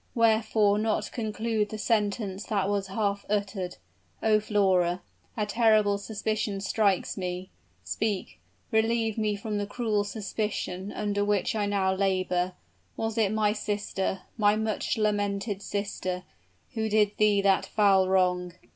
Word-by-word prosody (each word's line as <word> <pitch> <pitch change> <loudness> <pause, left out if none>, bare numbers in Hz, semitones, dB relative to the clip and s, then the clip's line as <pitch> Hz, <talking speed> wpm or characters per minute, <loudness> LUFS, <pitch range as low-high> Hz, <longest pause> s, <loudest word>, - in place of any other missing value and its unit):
wherefore 220 -2 +3
not 220 0 0
conclude 220 -1 -1
the 215 - -5
sentence 210 -2 0
that 200 -3 0
was 200 -1 0
half 200 0 -1
uttered? 200 -3 -2 0.5
Oh, 215 -1 +4
Flora 190 -4 +2 0.3
a 210 - +1
terrible 215 -2 +3
suspicion 215 -1 -2
strikes 195 -1 +1
me! 180 0 -4 0.3
Speak 205 - -2 0.3
relieve 225 0 +2
me 210 -1 +1
from 205 +1 -3
the 205 - -2
cruel 215 -2 0
suspicion 205 -2 -3
under 205 -1 -1
which 205 -2 +1
I 210 -2 0
now 195 -2 +1
labor; 185 -2 0 0.4
was 225 -1 -2
it 215 -3 +2
my 215 -1 +2
sister 205 -3 -2 0.2
my 205 0 +5
much 220 0 -1
lamented 205 -1 0
sister, 200 -3 -3 0.5
who 220 -1 -1
did 210 -1 +3
thee 210 -1 +4
that 195 -1 +3
foul 195 -3 +4
wrong?" 180 -2 +2
205 Hz, 135 wpm, -28 LUFS, 195-215 Hz, 0.5 s, my